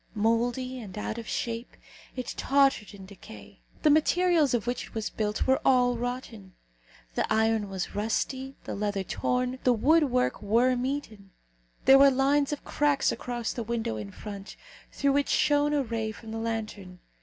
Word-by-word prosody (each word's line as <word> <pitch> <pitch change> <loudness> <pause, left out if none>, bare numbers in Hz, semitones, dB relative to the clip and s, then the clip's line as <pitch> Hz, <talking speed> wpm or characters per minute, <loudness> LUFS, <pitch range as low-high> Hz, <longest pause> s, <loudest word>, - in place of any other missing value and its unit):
Mouldy 240 +4 0
and 210 -4 -9
out 215 +2 -4
of 230 - -8
shape, 230 +1 -4 0.4
it 255 -2 -4
tottered 270 -7 +2
in 195 -1 -11
decay. 200 +3 -13 0.2
The 305 - +6
materials 315 -2 +3
of 235 - -2
which 245 +1 -3
it - - -19
was 220 -1 -3
built 210 -1 -2
were 265 0 +2
all 250 -2 +4
rotten. 235 -5 -6 0.6
The - - -1
iron 220 -1 +2
was 190 -2 -4
rusty, 260 +5 -2
the - - -5
leather 205 -1 -2
torn, 250 +5 -1
the 250 - +4
wood 300 +8 +4
work 250 -2 0
worm 245 +4 +2
eaten. 220 -8 -5 0.6
There 270 +1 +8
were 280 0 +8
lines 275 +2 +2
of 295 - -5
cracks 290 -1 +1
across 240 -2 -4
the 240 - -4
window 225 - -2
in 105 -2 -6
front, 200 - -9 0.4
through 280 -1 +1
which 285 0 +1
shone 295 -1 +3
a 290 -2 +1
ray 225 -2 -3
from 220 +1 -11
the 225 - -4
lantern. 215 -5 -5
240 Hz, 170 wpm, -28 LUFS, 215-270 Hz, 0.6 s, There